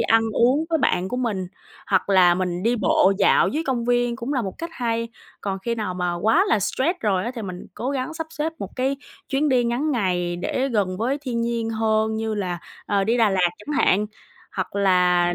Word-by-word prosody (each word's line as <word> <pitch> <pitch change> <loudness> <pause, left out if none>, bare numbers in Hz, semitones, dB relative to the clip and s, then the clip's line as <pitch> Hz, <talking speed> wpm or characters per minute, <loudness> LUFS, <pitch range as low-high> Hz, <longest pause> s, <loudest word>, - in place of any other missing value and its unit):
ăn 225 0 +4
uống 260 +9 +3
với 325 - +2
bạn 185 -9 +1
của 250 - -3
mình, 215 -7 -1 0.4
hoặc 190 -1 +1
là 185 -3 +6
mình 180 -1 -2
đi 235 +3 +2
bộ 195 -3 +3
dạo - - +4
dưới 310 +3 -2
công 250 -3 -1
viên, 245 0 +1
cũng 235 +5 -4
là 260 -4 0
một 190 -3 -4
cách 335 0 -5
hay. 230 -3 -2 0.3
Còn 195 -1 -3
khi 235 +5 -2
nào 210 -5 -3
mà 180 -1 -1
quá 220 - +3
là 215 - +3
stress 310 - 0
rồi 195 -3 +1
á, 240 - -2
thì 230 - -5
mình 180 -3 -7
cố 255 - -3
gắng 275 +3 -3
sắp 325 0 -4
xếp 315 +1 -2
một 200 +4 -7
cái 265 +2 0 0.3
chuyến 280 +3 +1
đi 255 -3 +3
ngắn 245 +6 0
ngày 180 -8 0
để 255 +9 -1
gần 200 -7 0
với 255 +6 0
thiên 245 -4 -2
nhiên 230 -1 -1
hơn, 220 0 +1
như 220 0 -2
là, 185 -4 -2 0.3
ờ, 200 -1 +1
đi 230 +4 +2
Đà 225 -3 +4
Lạt 180 -2 +2
chẳng 285 +8 -6
hạn, 205 +3 +3 0.5
hoặc - - -3
là, 180 -2 +3
225 Hz, 225 wpm, -23 LUFS, 190-255 Hz, 0.5 s, là